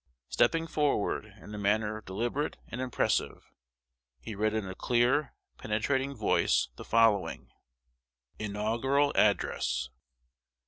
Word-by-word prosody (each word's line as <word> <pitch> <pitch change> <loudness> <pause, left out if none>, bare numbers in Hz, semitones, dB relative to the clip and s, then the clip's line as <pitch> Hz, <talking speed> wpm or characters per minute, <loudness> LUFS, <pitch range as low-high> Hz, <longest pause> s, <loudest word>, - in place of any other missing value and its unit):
Stepping 165 0 +2
forward, 145 -10 0
in 105 - -11
a 105 - -5
manner 105 +1 0
deliberate 120 +9 -2
and 125 - -5
impressive, 130 -1 -1 0.7
he 110 - -7
read 110 +2 0
in 110 -3 -2
a 95 - -5
clear, 125 +8 +1 0.2
penetrating 130 +6 -1
voice, 110 - +2
the - - -9
following 115 -3 +2 0.9
INAUGURAL 115 +7 +1
ADDRESS. 65 -11 +1
110 Hz, 105 wpm, -30 LUFS, 105-130 Hz, 0.9 s, Stepping